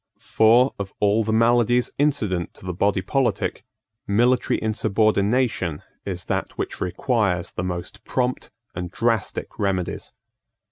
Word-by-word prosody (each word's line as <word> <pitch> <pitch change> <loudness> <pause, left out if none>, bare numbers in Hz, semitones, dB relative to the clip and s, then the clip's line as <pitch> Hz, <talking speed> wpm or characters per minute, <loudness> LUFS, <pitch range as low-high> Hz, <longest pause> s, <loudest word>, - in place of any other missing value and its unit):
For, 120 +4 +4
of 100 -1 -4
all 105 +2 +3
the 110 0 -1
maladies 120 +2 +3
incident 110 - 0
to - - -13
the 90 - -3
body 95 +1 +1
politic, 135 +5 0 0.4
military 120 +5 +2
insubordination 110 - +1 0.2
is 90 -3 -4
that - - -3
which - - -4
requires 100 -3 0
the - - -4
most 90 +3 -5
prompt 125 +1 -1 0.2
and 90 0 -5
drastic 115 +2 -1
remedies. 95 -3 -2
105 Hz, 125 wpm, -23 LUFS, 95-120 Hz, 0.4 s, For